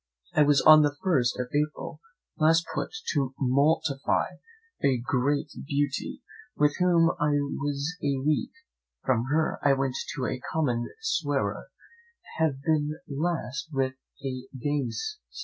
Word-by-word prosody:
I -, -, +4 dB
was 145 Hz, -2 st, +5 dB
on 155 Hz, 0 st, +9 dB
the 145 Hz, -1 st, +2 dB
first 130 Hz, -11 st, +2 dB
of 125 Hz, 0 st, -2 dB
April 150 Hz, +1 st, -2 dB, 0.4 s
last 165 Hz, +1 st, +4 dB
put -, -, -2 dB, 0.2 s
to 135 Hz, -4 st, 0 dB
mortify 140 Hz, +2 st, +1 dB, 0.5 s
a 135 Hz, -2 st, +4 dB
great 135 Hz, +4 st, 0 dB, 0.2 s
beauty, 145 Hz, -1 st, -2 dB, 0.3 s
with 150 Hz, 0 st, +3 dB
whom 170 Hz, -2 st, +4 dB
I 150 Hz, 0 st, +2 dB
was 145 Hz, +3 st, -2 dB
a 140 Hz, -2 st, 0 dB
week; 155 Hz, 0 st, +1 dB, 0.6 s
from 120 Hz, -3 st, +2 dB
her 155 Hz, +4 st, 0 dB
I 140 Hz, -, +4 dB
went 135 Hz, -1 st, 0 dB, 0.2 s
to 130 Hz, -, -2 dB
a 125 Hz, -, -3 dB
common 125 Hz, -7 st, 0 dB
swearer, 445 Hz, -, -1 dB, 0.7 s
and 160 Hz, 0 st, +4 dB
have 135 Hz, -, -13 dB
been 155 Hz, -1 st, +1 dB
last 150 Hz, -2 st, -2 dB
with 135 Hz, -2 st, 0 dB, 0.3 s
a 130 Hz, -1 st, -4 dB
gamester. 150 Hz, -, -2 dB
145 Hz, 135 wpm, -27 LUFS, 135-155 Hz, 0.7 s, on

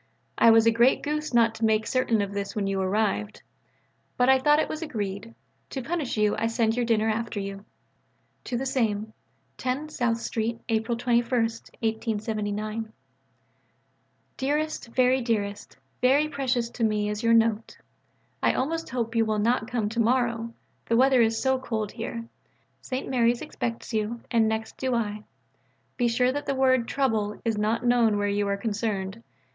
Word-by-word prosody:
I 230 Hz, -, +6 dB
was 225 Hz, 0 st, +6 dB
a 230 Hz, -, +6 dB
great 235 Hz, +3 st, +3 dB
goose 300 Hz, +1 st, -2 dB
not 230 Hz, -2 st, +4 dB
to 225 Hz, -, -7 dB
make 220 Hz, 0 st, +2 dB
certain 235 Hz, -5 st, +1 dB
of 200 Hz, 0 st, -5 dB
this 200 Hz, 0 st, -4 dB
when 205 Hz, -2 st, -1 dB
you 195 Hz, -1 st, -1 dB
arrived. 210 Hz, +2 st, -1 dB, 0.7 s
But 250 Hz, +1 st, +3 dB
I 265 Hz, 0 st, +6 dB
thought 295 Hz, +3 st, +4 dB
it 315 Hz, -, +1 dB
was 310 Hz, -, -5 dB
agreed. 215 Hz, -6 st, -4 dB, 0.3 s
To 265 Hz, -, -5 dB
punish 315 Hz, -5 st, -2 dB
you 210 Hz, -1 st, +2 dB
I 225 Hz, -, +1 dB
send 230 Hz, -1 st, +1 dB
your 240 Hz, -1 st, 0 dB
dinner 220 Hz, -1 st, +2 dB
after 220 Hz, -1 st, -2 dB
you. 195 Hz, 0 st, -6 dB, 0.8 s
(To 245 Hz, -, -2 dB
the 265 Hz, -, -3 dB
same.) 220 Hz, -5 st, -1 dB, 0.5 s
10 260 Hz, +4 st, -2 dB
SOUTH 245 Hz, -6 st, 0 dB
STREET, 230 Hz, 0 st, -2 dB
April 225 Hz, +1 st, 0 dB
21. 225 Hz, -2 st, -1 dB, 1.5 s
DEAREST, 295 Hz, +1 st, -1 dB
VERY 255 Hz, +2 st, +2 dB
DEAREST 205 Hz, -4 st, -3 dB, 0.2 s
Very 275 Hz, +4 st, +4 dB
precious 255 Hz, -5 st, -1 dB
to 240 Hz, -, -4 dB
me 210 Hz, -1 st, +1 dB
is 210 Hz, 0 st, -3 dB
your 230 Hz, 0 st, +4 dB
note. 225 Hz, -1 st, +1 dB, 0.6 s
I -, -, +3 dB
almost 325 Hz, +5 st, -2 dB
hope 235 Hz, -2 st, -2 dB
you 225 Hz, -, +4 dB
will 215 Hz, -1 st, 0 dB
not 225 Hz, +2 st, +1 dB
come 235 Hz, -4 st, -1 dB
to 230 Hz, +2 st, -4 dB
morrow: 230 Hz, -1 st, +1 dB, 0.4 s
the 230 Hz, -, +2 dB
weather 260 Hz, 0 st, +5 dB
is 225 Hz, 0 st, +2 dB
so 265 Hz, -1 st, +1 dB
cold 220 Hz, -5 st, -3 dB
here. 230 Hz, 0 st, -5 dB, 0.6 s
St. 260 Hz, 0 st, -4 dB
Mary's 240 Hz, -2 st, +2 dB
expects 230 Hz, 0 st, -5 dB
you: 220 Hz, +2 st, -2 dB
and 225 Hz, -2 st, +3 dB
next 220 Hz, 0 st, -3 dB
do 260 Hz, -2 st, -1 dB
I. 210 Hz, -2 st, -2 dB, 0.7 s
Be 245 Hz, -, +1 dB
sure 250 Hz, +2 st, +2 dB
that 290 Hz, +2 st, -4 dB
the 275 Hz, -, 0 dB
word 260 Hz, -3 st, +3 dB
"trouble" 220 Hz, -7 st, 0 dB
is 225 Hz, -1 st, +1 dB
not 225 Hz, +3 st, 0 dB
known 235 Hz, -3 st, +3 dB
where 205 Hz, 0 st, 0 dB
you 205 Hz, 0 st, 0 dB
are 200 Hz, 0 st, 0 dB
concerned. 205 Hz, -1 st, -3 dB
230 Hz, 170 wpm, -26 LUFS, 215-250 Hz, 1.5 s, I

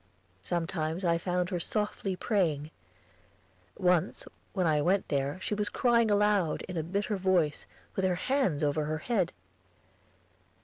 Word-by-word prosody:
Sometimes 165 Hz, -, -2 dB
I 170 Hz, -1 st, +3 dB
found 180 Hz, 0 st, -1 dB
her 180 Hz, -, -1 dB
softly 210 Hz, 0 st, -1 dB
praying. 165 Hz, -8 st, 0 dB, 1.1 s
Once 180 Hz, -1 st, +1 dB, 0.3 s
when 185 Hz, -3 st, +1 dB
I 155 Hz, -2 st, +3 dB
went 185 Hz, +5 st, +1 dB
there 140 Hz, +4 st, -1 dB
she -, -, -2 dB
was 210 Hz, 0 st, 0 dB
crying 235 Hz, -2 st, +3 dB
aloud, 205 Hz, -5 st, +2 dB
in 185 Hz, -, -7 dB
a 165 Hz, -, 0 dB
bitter 200 Hz, +5 st, -2 dB
voice, 180 Hz, -5 st, +1 dB, 0.3 s
with 190 Hz, -, -1 dB
her 185 Hz, -1 st, +2 dB
hands 200 Hz, -, 0 dB
over 150 Hz, +1 st, +1 dB
her 155 Hz, +1 st, -1 dB
head. 190 Hz, 0 st, 0 dB
180 Hz, 140 wpm, -30 LUFS, 160-200 Hz, 1.1 s, I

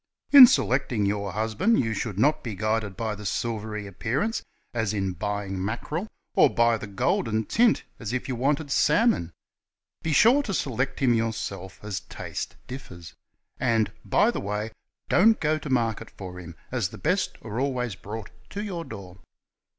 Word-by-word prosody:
''In 270 Hz, -3 st, +13 dB
selecting 125 Hz, -, +1 dB
your 100 Hz, -1 st, -1 dB
husband 115 Hz, -, +1 dB
you 115 Hz, -2 st, 0 dB
should 105 Hz, -2 st, -3 dB
not 145 Hz, +8 st, +3 dB
be 115 Hz, -4 st, -4 dB
guided 110 Hz, -1 st, -1 dB
by 110 Hz, -2 st, -2 dB
the 105 Hz, 0 st, -9 dB
silvery 105 Hz, 0 st, -3 dB
appearance, 120 Hz, -, -2 dB, 0.3 s
as 110 Hz, -3 st, -1 dB
in 95 Hz, -2 st, -1 dB
buying 100 Hz, -1 st, -3 dB
mackerel, 150 Hz, -, -3 dB, 0.3 s
or -, -, +6 dB
by 120 Hz, 0 st, +3 dB
the 110 Hz, -, -6 dB
golden 110 Hz, +2 st, 0 dB
tint, 230 Hz, -, +3 dB, 0.2 s
as 115 Hz, -2 st, -4 dB
if 130 Hz, +2 st, -2 dB
you 130 Hz, -, -2 dB
wanted 140 Hz, +4 st, 0 dB
salmon. 150 Hz, -, +3 dB, 0.7 s
Be 160 Hz, -, -2 dB
sure 235 Hz, -, +6 dB
to 205 Hz, -9 st, -3 dB
select 130 Hz, -1 st, -2 dB
him 125 Hz, -3 st, +4 dB
yourself, 110 Hz, -4 st, -3 dB
as 105 Hz, -2 st, -3 dB
taste 80 Hz, -, -6 dB
differs. 110 Hz, -10 st, -9 dB, 0.5 s
And 115 Hz, -4 st, +2 dB
by -, -, +3 dB
the -, -, -4 dB
way, 105 Hz, +2 st, -3 dB, 0.4 s
don't 220 Hz, +5 st, +5 dB
go 155 Hz, 0 st, +1 dB
to 150 Hz, -, -7 dB
market 115 Hz, -3 st, 0 dB
for 90 Hz, -2 st, -9 dB
him, 85 Hz, -2 st, -10 dB, 0.2 s
as 120 Hz, -8 st, 0 dB
the -, -, -10 dB
best 180 Hz, +5 st, 0 dB
are 110 Hz, +1 st, -4 dB
always 125 Hz, -4 st, -1 dB
brought 105 Hz, +3 st, -8 dB, 0.2 s
to 205 Hz, 0 st, -4 dB
your 180 Hz, -5 st, -4 dB
door. 95 Hz, -, -10 dB
115 Hz, 165 wpm, -26 LUFS, 100-140 Hz, 0.7 s, In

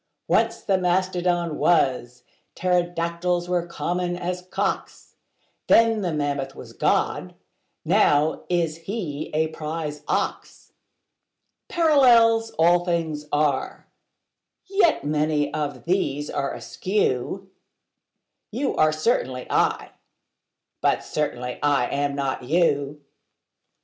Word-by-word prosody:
Once -, -, +1 dB
the 195 Hz, -3 st, +1 dB
mastodon 180 Hz, -2 st, 0 dB
was: 125 Hz, -7 st, +1 dB, 0.3 s
pterodactyls 175 Hz, 0 st, 0 dB
were 175 Hz, -1 st, -1 dB
common 175 Hz, +1 st, -2 dB
as 180 Hz, 0 st, -3 dB
cocks: 180 Hz, -, -4 dB, 0.5 s
Then 225 Hz, -1 st, +4 dB
the 180 Hz, -3 st, -1 dB
mammoth 145 Hz, -3 st, -2 dB
was -, -, -11 dB
God: -, -, 0 dB, 0.5 s
now 150 Hz, +2 st, +3 dB
is 170 Hz, -3 st, 0 dB
He 165 Hz, -5 st, -5 dB
a 155 Hz, +1 st, 0 dB
prize 155 Hz, -1 st, -5 dB
ox. -, -, -3 dB, 1.0 s
Parallels 240 Hz, -8 st, +4 dB
all 175 Hz, +2 st, +4 dB
things 160 Hz, -4 st, -2 dB
are: 145 Hz, -2 st, -1 dB, 0.8 s
yet 385 Hz, -, +2 dB
many 150 Hz, 0 st, 0 dB
of 145 Hz, -5 st, -4 dB
these 145 Hz, -5 st, -1 dB
are 140 Hz, -1 st, -2 dB
askew: 190 Hz, 0 st, -2 dB, 1.0 s
You 260 Hz, +5 st, -2 dB
are 155 Hz, 0 st, +4 dB
certainly 155 Hz, -, -1 dB
I: -, -, +1 dB, 0.9 s
but -, -, +1 dB
certainly 125 Hz, -5 st, -3 dB
I 145 Hz, -4 st, +2 dB
am 140 Hz, +2 st, -1 dB
not 135 Hz, -2 st, -2 dB
you. 145 Hz, 0 st, 0 dB
165 Hz, 100 wpm, -24 LUFS, 145-180 Hz, 1.0 s, Then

